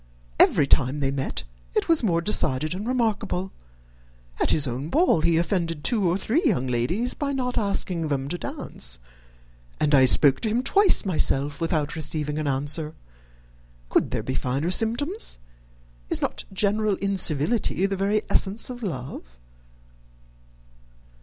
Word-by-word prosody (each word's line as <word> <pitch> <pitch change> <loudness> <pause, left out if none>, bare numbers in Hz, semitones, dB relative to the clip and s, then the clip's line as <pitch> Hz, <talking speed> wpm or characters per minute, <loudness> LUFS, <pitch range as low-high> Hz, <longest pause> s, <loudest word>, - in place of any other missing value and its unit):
Every 145 - +5
time 140 +1 +2
they 135 -1 0
met, 135 -1 -3 0.3
it - - +1
was 330 -2 +4
more 170 -7 +1
decided 155 -6 0
and 200 +5 -5
remarkable. 215 -6 -1 0.9
At - - +1
his 150 - +4
own 130 +4 -4
ball 310 - +3
he 165 +1 +2
offended 170 -3 -1
two 210 -7 +3
or 175 - +1
three 235 - 0
young 185 - +1
ladies 130 - -1
by 285 -1 -3
not 250 -2 -2
asking 195 -6 0
them 140 -2 -2
to 175 - -3
dance; - - -3 0.8
and 150 0 +1
I 135 -2 +6
spoke 135 +1 +5
to 220 - -1
him 235 +4 0
twice 400 - +4
myself 145 -5 0
without 155 -3 -1
receiving 150 -1 -2
an 155 - -2
answer. 145 +3 +1 0.9
Could - - +1
there - - -3
be - - -3
finer 135 +7 -2
symptoms? 240 - 0 0.7
Is - - 0
not - - -3
general 205 +1 0
incivility 195 - 0
the 195 0 -1
very 200 +3 0
essence 210 +5 0
of 245 0 -9
love?" 140 - -5
175 Hz, 145 wpm, -24 LUFS, 145-215 Hz, 0.9 s, I